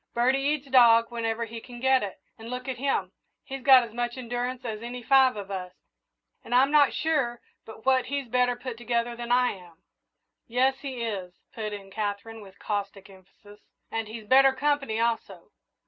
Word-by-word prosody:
Birdie 255 +3 +3
eats 285 +1 -1
dog 235 -3 +5
whenever 230 -1 -2
he 225 0 -8
can 240 0 -11
get 265 +1 +3
it, 200 -2 -6 0.2
and 225 0 -10
look 250 +1 -5
at 255 -2 -4
him 250 -9 -1 0.3
he's 270 0 -7
got 260 -1 +7
as 230 -2 -9
much 240 +1 -3
endurance 245 +1 -4
as 220 -2 -4
any 240 +1 -7
five 265 0 +5
of 200 -1 -7
us, 180 -2 -5 0.7
and 245 - -2
I'm 270 +3 +5
not 290 -3 +5
sure 270 -7 0 0.3
but 220 0 -12
what 260 -1 +3
he's 280 -1 -3
better 245 +1 +2
put 245 -1 -7
together 235 0 -1
than 235 0 -6
I 250 0 +4
am." 175 -3 -14 0.6
"Yes, 260 +3 +1
he 260 -4 -5
is," 190 -6 -4 0.2
put 215 -2 -4
in 195 -2 -8
Katherine, 215 +2 -4
with 195 -1 -14
caustic 200 -1 -4
emphasis; 195 +2 -18 0.3
"and 225 -1 -3
he's 220 0 -8
better 270 +3 +6
company, 275 -5 0
also. 230 -1 -2
240 Hz, 185 wpm, -27 LUFS, 215-260 Hz, 0.7 s, got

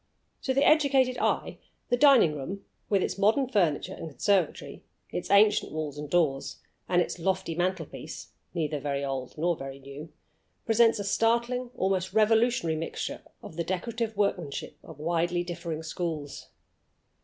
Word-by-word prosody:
To 265 - 0
the 275 - +4
educated 275 -4 +4
eye - - -1 0.3
the 245 - +4
dining 255 - +6
room, 180 +8 -6 0.2
with 200 -3 +2
its 195 - -3
modern 225 +7 +3
furniture 180 - +1
and 165 - -7
conservatory, 170 +5 0 0.3
its 175 - -4
ancient 205 +1 +4
walls 150 -2 -4
and 150 -1 -6
doors, 140 -5 +1 0.3
and 175 -1 +4
its - - -7
lofty 185 -1 -1
mantelpiece 175 -1 -4 0.3
(neither 155 -3 -1
very 140 0 -2
old 135 -1 -4
nor 170 +2 +1
very 135 -2 -7
new), 140 +3 -10 0.5
presents 225 0 +4
a 205 - -3
startling, 235 +4 +1
almost 185 -1 0
a - - -15
revolutionary, 220 -5 +3
mixture 165 - -4 0.2
of 160 - -10
the 170 - 0
decorative 220 +4 -3
workmanship 180 -8 -1
of - - -12
widely 170 +2 0
differing 170 -2 -5
schools. 160 -3 -4
175 Hz, 150 wpm, -28 LUFS, 155-220 Hz, 0.5 s, dining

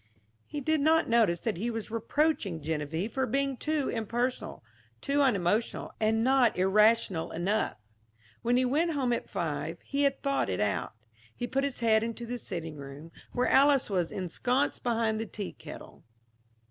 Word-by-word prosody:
He 295 - -5
did 315 +2 +1
not 320 +2 +4
notice 220 -8 +3
that 220 -6 -2
he 225 +7 -2
was 225 -2 -5
reproaching 230 - 0
Geneviève 160 +6 -3
for 265 -1 -1
being 275 0 0
too 305 +2 -1
impersonal, 240 - -2 0.4
too 285 - +1
unemotional 215 -4 +1
and 220 +1 +2
not 255 -4 +4
irrational 195 -2 +3
enough. 185 - -1 0.6
When 240 +1 +2
he 255 - +3
went 320 +6 +1
home 260 -4 +1
at 235 - -3
five, 165 -2 -3
he 280 0 -2
had 275 -1 +1
thought 275 - +1
it 90 - -2
out. 100 -3 -1 0.4
He 245 - -3
put 270 +3 -1
his 280 -3 -3
head 220 -1 +4
into 230 +1 -4
the 245 +1 -4
sitting 165 -7 -5
room, 140 +3 -10 0.2
where 250 - +1
Alys 275 -4 +4
was 180 -4 0
ensconced 245 - -1
behind 230 -2 0
the 225 - -3
tea 200 -1 -6
kettle. - - -11
230 Hz, 165 wpm, -29 LUFS, 180-265 Hz, 0.6 s, not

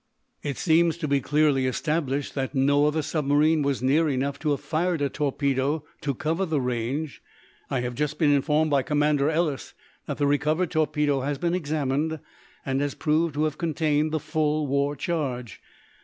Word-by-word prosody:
"It 140 -3 -4
seems 165 0 +3
to 165 -3 -3
be 140 -1 +2
clearly 145 -2 +2
established 145 0 -1
that 135 0 -3
no 145 +2 +3
other 155 +1 0
submarine 150 +1 +2
was 140 -3 -1
near 150 +5 +3
enough 140 +1 -1
to 155 - -1
have 145 - +1
fired 170 +2 -1
a 140 -1 0
torpedo 140 +1 -1 0.2
to 140 -3 -2
cover 160 +8 -1
the 160 -5 0
range 125 +4 -3 0.5
I 130 - 0
have 125 0 -3
just 150 +3 -2
been 150 -4 +3
informed 150 +2 +2
by 140 -1 +3
Commander 145 0 +1
Ellis 160 -3 -1 0.3
that - - -3
the 145 - +1
recovered 150 +5 +1
torpedo 150 -2 +1
has 140 +2 -2
been 170 +1 -1
examined, 155 -2 -1 0.5
and 135 0 0
has 145 -1 -2
proved 155 0 +1
to 150 - +1
have 155 -1 -2
contained 155 -2 0
the 155 - 0
full 155 0 0
war 140 +1 0
charge. 130 - -3
150 Hz, 175 wpm, -25 LUFS, 140-155 Hz, 0.5 s, seems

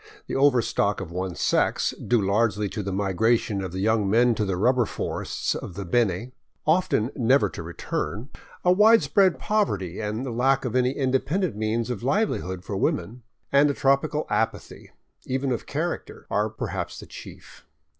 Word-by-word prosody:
The - - -5
overstock 125 -7 +2
of 95 -4 -7
one 90 0 -3
sex, - - +1
due 115 -5 0
largely 105 0 +1
to 105 +2 -4
the 100 -1 -4
migration 100 +2 +1
of 95 -3 -5
the 95 +1 -4
young 110 -1 +2
men 120 +3 +4
to 110 -1 -1
the 95 -2 -1
rubber 120 +3 +2
forests - - -3
of 85 - -7
the 100 0 -5
Beni, 110 +3 0 0.3
often 155 -7 +2
never 130 +2 +3
to - - -7
return; 105 - -4 0.4
a 180 - +6
widespread 205 -2 +5
poverty 100 - -1
and 110 +4 -3
the 130 - -4
lack 130 +3 +2
of 125 - -3
any 125 +1 +2
independent 140 - 0
means 110 +3 -1
of 115 - -4
livelihood 125 - -1
for 100 - -4
women; 100 +5 -1 0.3
and 140 +1 +5
a 140 - -1
tropical 145 +3 +1
apathy, 115 0 -2 0.4
even 130 +1 -1
of 120 - -3
character, - - -4
are 105 +1 +1
perhaps 110 - -5
the - - -9
chief. - - -12
115 Hz, 165 wpm, -25 LUFS, 100-135 Hz, 0.4 s, a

